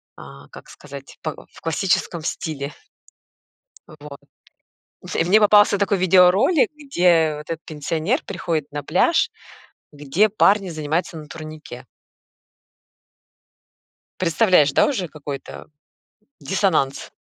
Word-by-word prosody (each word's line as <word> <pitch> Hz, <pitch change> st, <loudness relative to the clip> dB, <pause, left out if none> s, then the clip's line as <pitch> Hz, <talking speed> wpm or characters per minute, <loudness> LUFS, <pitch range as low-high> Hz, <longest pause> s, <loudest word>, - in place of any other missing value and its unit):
а, 70 Hz, +1 st, -13 dB
как -, -, -14 dB
сказать, 140 Hz, -1 st, -12 dB
па 155 Hz, -2 st, -4 dB, 0.2 s
в -, -, -17 dB
классическом 170 Hz, 0 st, -1 dB
стиле. 145 Hz, -3 st, -4 dB, 1.2 s
Вот. 145 Hz, -2 st, -12 dB, 1.0 s
И -, -, +2 dB
мне 190 Hz, +6 st, +4 dB
попался 205 Hz, -1 st, +5 dB
такой 200 Hz, 0 st, 0 dB
видеоролик, 190 Hz, -, +4 dB
где 175 Hz, -, +1 dB
вот 150 Hz, -, -11 dB
этот 165 Hz, -1 st, -5 dB
пенсионер 160 Hz, -, -2 dB
приходит 165 Hz, -5 st, -4 dB
на 145 Hz, 0 st, -5 dB
пляж, 320 Hz, -, +2 dB, 0.6 s
где 150 Hz, +8 st, +1 dB
парни 200 Hz, -1 st, +2 dB
занимаются 160 Hz, +2 st, -3 dB
на 155 Hz, -1 st, -10 dB
турнике. 155 Hz, -5 st, -10 dB, 2.4 s
Представляешь, 175 Hz, -4 st, +3 dB
да, -, -, +4 dB
уже 205 Hz, -11 st, -2 dB
какой 145 Hz, -3 st, -7 dB
это -, -, -12 dB, 0.7 s
диссонанс? 170 Hz, -9 st, -1 dB
165 Hz, 110 wpm, -21 LUFS, 150-195 Hz, 2.4 s, попался